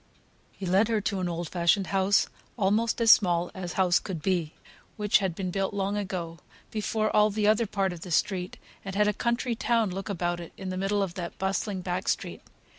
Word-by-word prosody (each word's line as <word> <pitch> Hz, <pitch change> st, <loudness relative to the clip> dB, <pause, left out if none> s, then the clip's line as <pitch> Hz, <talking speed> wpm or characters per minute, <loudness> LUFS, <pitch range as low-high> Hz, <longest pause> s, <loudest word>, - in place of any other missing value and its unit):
He 195 Hz, -, -8 dB
led 190 Hz, +4 st, +3 dB
her 225 Hz, -2 st, +1 dB
to 195 Hz, 0 st, -1 dB
an 180 Hz, -1 st, -1 dB
old 170 Hz, 0 st, -3 dB
fashioned 175 Hz, +4 st, +2 dB
house, 195 Hz, +1 st, +3 dB, 0.3 s
almost 220 Hz, +3 st, +1 dB
as 230 Hz, -1 st, +7 dB
small 175 Hz, -3 st, +4 dB
as 180 Hz, -2 st, -5 dB
house 185 Hz, -2 st, +3 dB
could 185 Hz, -5 st, -5 dB
be, 175 Hz, -5 st, 0 dB, 0.4 s
which 210 Hz, -1 st, +3 dB
had 190 Hz, -4 st, -2 dB
been 185 Hz, -1 st, -3 dB
built 195 Hz, +2 st, -1 dB
long 200 Hz, 0 st, -1 dB
ago, 180 Hz, -5 st, -4 dB, 0.3 s
before 215 Hz, 0 st, -1 dB
all 210 Hz, 0 st, +5 dB
the 210 Hz, 0 st, -1 dB
other 215 Hz, +2 st, +3 dB
part 195 Hz, -2 st, -1 dB
of 170 Hz, -, -10 dB
the 180 Hz, -, -8 dB
street, 180 Hz, +2 st, 0 dB, 0.3 s
and 195 Hz, -1 st, -6 dB
had 210 Hz, +1 st, +3 dB
a 210 Hz, -, +2 dB
country 235 Hz, +2 st, -1 dB
town 230 Hz, -3 st, +1 dB
look 195 Hz, +3 st, -5 dB
about 175 Hz, -2 st, -1 dB
it 170 Hz, -, -9 dB
in 190 Hz, -1 st, -5 dB
the 185 Hz, -, -3 dB
middle 200 Hz, +1 st, +1 dB
of 185 Hz, -3 st, -4 dB
that 175 Hz, -2 st, -6 dB
bustling 190 Hz, 0 st, -1 dB
back 180 Hz, +1 st, -3 dB
street. -, -, -2 dB
195 Hz, 210 wpm, -27 LUFS, 180-210 Hz, 0.4 s, as